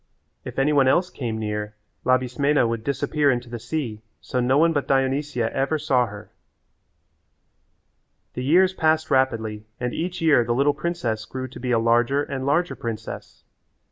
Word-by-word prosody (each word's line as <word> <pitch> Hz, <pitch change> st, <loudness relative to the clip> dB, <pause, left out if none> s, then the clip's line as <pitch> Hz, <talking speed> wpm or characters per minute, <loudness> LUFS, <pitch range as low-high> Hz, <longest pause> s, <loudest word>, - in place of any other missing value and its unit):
If -, -, -8 dB
any 140 Hz, +3 st, +2 dB
one 135 Hz, -2 st, +4 dB
else 180 Hz, +7 st, +2 dB
came 115 Hz, -4 st, -4 dB
near 105 Hz, -1 st, -4 dB, 0.3 s
Labismena 130 Hz, +2 st, +2 dB
would 115 Hz, -1 st, -3 dB
disappear 145 Hz, +2 st, +1 dB
into 120 Hz, -2 st, -1 dB
the 120 Hz, -, -5 dB
sea 120 Hz, -3 st, -4 dB, 0.2 s
so 125 Hz, -, -3 dB
no 125 Hz, +2 st, +2 dB
one 165 Hz, +2 st, +4 dB
but 145 Hz, -2 st, -1 dB
Dionysia 135 Hz, -2 st, 0 dB
ever 135 Hz, +4 st, +1 dB
saw 130 Hz, -5 st, +1 dB
her. 100 Hz, -1 st, -11 dB, 2.0 s
The 125 Hz, -, -4 dB
years 185 Hz, +7 st, +4 dB
passed 160 Hz, -2 st, +1 dB
rapidly 110 Hz, -5 st, 0 dB
and 125 Hz, 0 st, -2 dB
each 175 Hz, +2 st, -3 dB
year 155 Hz, -7 st, +4 dB
the 120 Hz, +1 st, -1 dB
little 140 Hz, +3 st, +3 dB
princess 150 Hz, -9 st, -2 dB
grew 130 Hz, +2 st, -5 dB
to -, -, -11 dB
be 125 Hz, -, -4 dB
a 120 Hz, -, +3 dB
larger 120 Hz, +5 st, +2 dB
and 135 Hz, -2 st, -4 dB
larger 170 Hz, +5 st, +1 dB
princess. 115 Hz, -1 st, -7 dB
130 Hz, 165 wpm, -23 LUFS, 120-145 Hz, 2.0 s, one